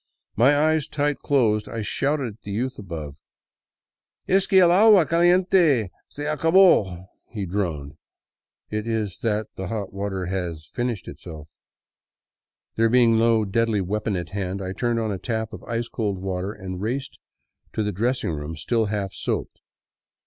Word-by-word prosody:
My 135 +7 +5
eyes 155 0 +2
tight 145 -1 -1
closed, 110 -7 +1
I 115 -2 -4
shouted 135 0 -1
at 105 - -24
the - - -10
youth 125 +6 -3
above. 80 -7 -7 0.6
" - - -57
Es 195 - +3
que 190 - +5
el 175 -2 +6
agua 200 -1 +6
caliente 170 - +3 0.2
se 145 - -6
acabo," 155 - +4 0.2
he 105 -4 -4
droned. 85 -7 -3 0.4
" - - -59
It 105 +1 -3
is 110 -5 -2
that 110 -1 -2
the 95 - -4
hot 100 -2 -4
water 100 -2 -3
has 90 -4 -4
finished 120 -5 -3
itself." 80 -2 -9 1.3
There 115 0 +3
being 115 -2 +4
no 115 -1 +3
deadly 110 +1 +1
weapon 105 +2 -2
at 85 -2 -4
hand, 95 -1 -3
I 95 -1 -4
turned 120 +3 0
on 110 -2 -1
a 95 - -4
tap 110 0 -3
of - - -9
ice 115 0 -2
cold 105 -5 -2
water 95 +1 -3
and 95 -3 -7
raced 130 +6 -4 0.5
to 110 - -1
the 105 - -1
dressing 120 +1 -1
room 75 +1 -5
still 110 +9 0
half 100 -2 -3
soaped. - - -4
110 Hz, 165 wpm, -24 LUFS, 95-130 Hz, 1.3 s, el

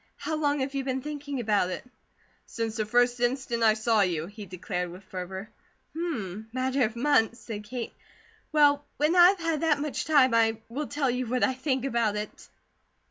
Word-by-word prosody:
How 315 - -3
long 290 -2 +1
have 270 +1 -2
you 275 -1 -1
been 260 -1 -2
thinking 290 -2 -5
about 210 -5 +1
it?" 185 - -5 0.6
"Since 225 -2 -3
the 215 -1 -1
first 245 +2 +3
instant 245 -1 0
I 220 -1 +5
saw 220 0 +2
you!" 170 -5 0
he 205 +2 -10
declared 180 0 -4
with 180 +3 -11
fervour. 190 +2 -7 0.4
"Hum! 220 - -4
Matter 260 +2 0
of 220 +2 -4
months," 235 -3 +2
said 210 -2 -7
Kate. 240 +1 -5 0.6
"Well, 290 -1 +4
when 305 +4 +2
I 350 -1 +9
have 390 -1 0
had 330 -3 -1
that 315 -3 +2
much 295 -1 -3
time, 275 -6 +5
I 225 -1 +3
will 280 +5 -4
tell 285 -3 0
you 250 0 -2
what 250 +2 0
I 260 - +3
think 260 0 -1
about 235 -5 +1
it." 210 0 -6
245 Hz, 190 wpm, -27 LUFS, 215-285 Hz, 0.6 s, I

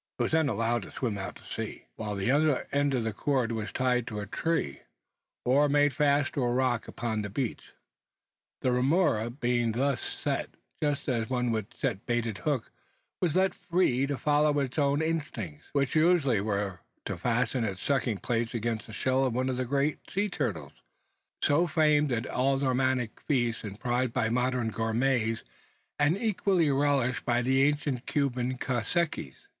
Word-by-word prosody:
It - - +1
was - - -1
then 160 -2 +3
allowed 115 +1 0
to - - -10
swim 120 -6 -2
out 95 - -5
into - - -18
the - - -13
sea; - - -5
while 105 -2 -4
the 100 +5 +1
other 145 -1 +2
end 140 -1 +2
of 120 - 0
the 110 -1 -2
cord 130 0 0
was 110 -1 -3
tied 125 -2 +1
to 105 - -4
a 100 - -4
tree, 105 - -1 0.7
or 140 +4 +4
made 145 0 +3
fast 145 0 +2
to 145 - -1
a 120 - +1
rock 125 -2 +1
upon 110 -2 -2
the 105 - -4
beach. 120 +3 -4 0.9
The 130 - +2
remora 125 - +2
being 120 -2 0
thus 135 +2 0
set - - -3 0.3
just 145 -2 0
as 115 -5 0
one 125 -2 0
would 110 -3 -3
set - - -1
a - - -24
baited 120 -2 -2
hook 140 -7 -1 0.5
was 175 -4 +1
left 190 +1 +3
free 140 -7 +1
to 140 -1 -2
follow 150 +3 +2
its 140 +1 -1
own 145 +1 +2
inclinations, 135 - -3
which 140 -2 +1
usually 155 - +4
were 100 -2 -2 0.3
to - - -2
fasten 120 +5 0
its 95 -3 -3
sucking 130 -6 +1
plates 120 0 -1
against 115 -1 -2
the 110 - -10
shell 130 +4 +1
of 130 -3 0
one 130 +1 0
of 130 - -1
the 130 - -1
great 140 +4 -1
sea 205 +2 0
turtles, 85 - -3 0.7
so 165 +5 +3
famed 150 -3 +3
at 120 0 0
aldermanic 130 -2 +1
feasts 120 -5 +1
and 105 -1 -7
prized 125 -1 0
by 110 - +1
modern 125 0 +1
gourmets, 115 +1 0 0.6
and 145 +5 +3
equally 195 -7 +2
relished 135 -3 +1
by 120 0 +1
the 130 +2 +3
ancient 145 -3 0
Cuban 130 -3 0
caciques. 125 - -2
130 Hz, 180 wpm, -29 LUFS, 115-145 Hz, 0.9 s, or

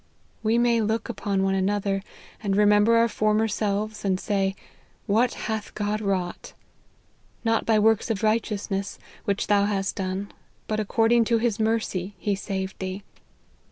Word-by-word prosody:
We 225 +1 +2
may 235 -1 +3
look 220 +2 -1
upon 200 -4 -1
one 195 0 +1
another, 195 0 0 0.4
and 200 -3 0
re 210 - +5
member 210 +2 +5
our 230 0 +5
former 215 0 +1
selves, 210 0 -2
and 190 -2 +1
say, 195 -2 0 0.3
' - - -35
What 230 +4 +2
hath 220 -2 -4
God 210 +1 -1
wrought 190 -4 -2 0.3
!' - - -38
' - - -36
Not 225 0 +1
by 220 -1 +4
works 220 +1 +3
of 220 -1 -2
righteousness 210 -2 -1 0.3
which 200 0 0
thou 200 -1 +3
hast 195 -2 -1
done, 190 +1 -3 0.4
but 215 0 -1
according 225 +2 +3
to 230 +1 +2
his 225 -1 0
mercy 215 -4 -1
he 205 - -1
saved 190 -1 -4
thee.' 190 +1 -4
210 Hz, 165 wpm, -25 LUFS, 195-220 Hz, 0.4 s, re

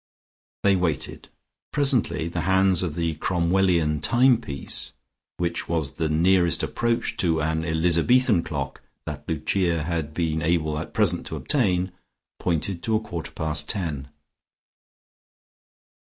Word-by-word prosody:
They 100 -1 +5
waited. 90 -4 -2 0.4
Presently 135 - +2
the 85 0 -3
hands 95 -1 +4
of 85 -5 -2
the 85 -1 -1
Cromwellian 85 -3 +1
timepiece 120 - +1 0.4
which 85 -1 -2
was 80 -4 -1
the 80 -2 -2
nearest 85 +1 +3
approach 120 0 -1
to 80 -3 +1
an 80 +1 0
Elizabethan 85 +7 +3
clock 70 -5 -5 0.2
that - - -7
Lucia 85 +1 0
had 80 -2 -3
been 80 -2 0
able 80 -2 0
at - - -8
present - - +1
to - - -5
obtain, 95 -9 0 0.5
pointed 85 +1 -1
to 110 +3 0
a - - +3
quarter 85 -7 -6
past 75 -1 -2
ten. 75 -8 -3
85 Hz, 120 wpm, -24 LUFS, 80-95 Hz, 0.5 s, They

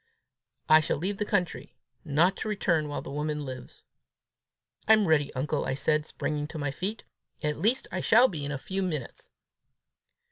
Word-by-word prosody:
"I 155 - +8
shall 155 - -1
leave 195 +6 -3
the 210 - 0
country, 180 -4 -1 0.3
not 170 +5 +3
to - - -4
return 170 -7 +1
while 145 - -4
the - - -8
woman 150 0 -2
lives." 130 -1 -9 1.0
"I'm 215 -1 +6
ready, 150 -3 +3
uncle," 145 +3 -1
I 130 - -1
said, 150 +2 0
springing 150 -1 -3
to 160 - -8
my 145 -2 -2
feet; 200 +9 -4 0.2
" - - -30
at 150 0 -1
least 230 +9 +1
I - - -2
shall 245 +3 +6
be 155 - -5
in 140 - -3
a 140 - -2
few 190 +8 -4
minutes!" 155 -9 -4
155 Hz, 180 wpm, -28 LUFS, 145-190 Hz, 1.0 s, I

